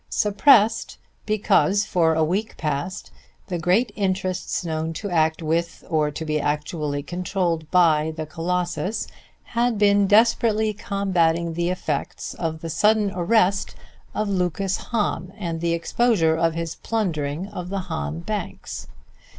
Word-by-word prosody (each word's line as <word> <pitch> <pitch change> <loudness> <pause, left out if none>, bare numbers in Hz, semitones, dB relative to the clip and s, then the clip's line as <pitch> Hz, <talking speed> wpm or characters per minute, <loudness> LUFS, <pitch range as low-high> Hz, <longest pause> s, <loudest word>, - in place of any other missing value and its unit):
Suppressed: 210 +1 +3 0.3
because 205 -1 +2
for 165 -4 +2
a 160 - +3
week 195 +7 -1
past 150 +4 -3 0.4
the 175 -2 -2
great 195 +8 +2
interests 185 -2 -1
known 160 0 -2
to 205 +4 -5
act 160 -1 +1
with 165 +2 -1
or 155 -2 +2
to 160 +2 -6
be 155 -1 0
actually 150 -1 -2
controlled 175 -1 -2
by 160 -3 +4
the 155 - -3
Colossus 180 +5 -2 0.4
had 235 -1 0
been 205 -1 +4
desperately 220 0 +3
combating 170 -5 0
the 170 +1 -1
effects 180 -1 -3
of 160 -2 -4
the 165 - -5
sudden 210 +4 +3
arrest 195 +1 +2 0.4
of 215 - 0
Lucas 190 0 0
Hahn, 195 -5 -1
and 170 -5 -4
the 170 0 +1
exposure 170 -1 +2
of 165 0 +1
his 165 -1 -3
plundering 170 -6 -2
of 180 -2 -6
the 195 0 -2
Hahn 75 - -4
banks. - - -5
180 Hz, 135 wpm, -23 LUFS, 160-200 Hz, 0.4 s, by